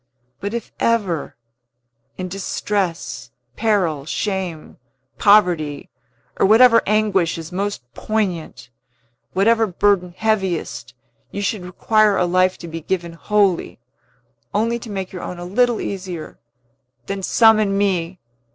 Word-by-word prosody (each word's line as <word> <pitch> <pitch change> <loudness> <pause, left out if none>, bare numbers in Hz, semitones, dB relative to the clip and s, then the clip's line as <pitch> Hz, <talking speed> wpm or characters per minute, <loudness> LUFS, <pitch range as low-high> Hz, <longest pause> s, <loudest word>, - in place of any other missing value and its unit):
But 200 +4 -4
if 235 - -5
ever 205 -9 0 0.8
in 185 - -4
distress, 180 - -3 0.3
peril, 180 -10 0
shame, 190 -6 -3 0.4
poverty, 175 -9 +3 0.5
or - - +4
whatever 230 +2 +7
anguish 205 -6 +2
is 165 0 -8
most 200 -5 -3
poignant, 180 - -3 0.6
whatever 225 +4 +3
burden 180 -2 +1
heaviest 180 - -1 0.3
you 200 - -4
should 200 -1 -2
require 210 +3 +2
a 180 - +2
life 185 +1 +2
to 170 - -9
be 165 0 -6
given 170 0 -3
wholly, 200 +1 +1 0.8
only 230 +3 +1
to 235 - -10
make 190 -2 -4
your 180 - -6
own 180 - -6
a 175 - -7
little 240 +5 +2
easier, 180 -5 -6 0.7
then 195 0 -4
summon 215 -1 +4
me! 185 -3 0
190 Hz, 120 wpm, -20 LUFS, 175-215 Hz, 0.8 s, whatever